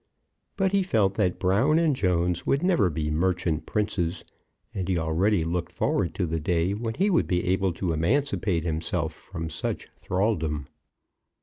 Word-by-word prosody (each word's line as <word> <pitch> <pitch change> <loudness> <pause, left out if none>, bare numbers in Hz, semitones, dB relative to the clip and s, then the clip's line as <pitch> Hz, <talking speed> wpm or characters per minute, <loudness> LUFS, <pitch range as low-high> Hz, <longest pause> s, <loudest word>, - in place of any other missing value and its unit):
But 190 -1 +2
he 200 0 +3
felt 110 - +2
that 95 -4 0
Brown 115 +12 +3
and 165 -4 +3
Jones 90 -4 +1
would 140 +4 +1
never 170 - +3
be 75 -1 -2
Merchant 85 -1 0
Princes, 100 -5 -1 0.5
and 95 -2 -3
he 95 -2 +1
already 85 +4 +1
looked 85 +1 -2
forward - - 0
to - - 0
the 80 0 -2
day 85 +3 +1
when 110 +2 -3
he 200 +3 +2
would 170 - +2
be 90 -1 0
able 95 +1 +1
to 85 0 -2
emancipate 100 - +1
himself 80 -1 -2
from 80 -1 -7
such - - -4
thraldom. 80 - -1
90 Hz, 165 wpm, -26 LUFS, 85-110 Hz, 0.5 s, he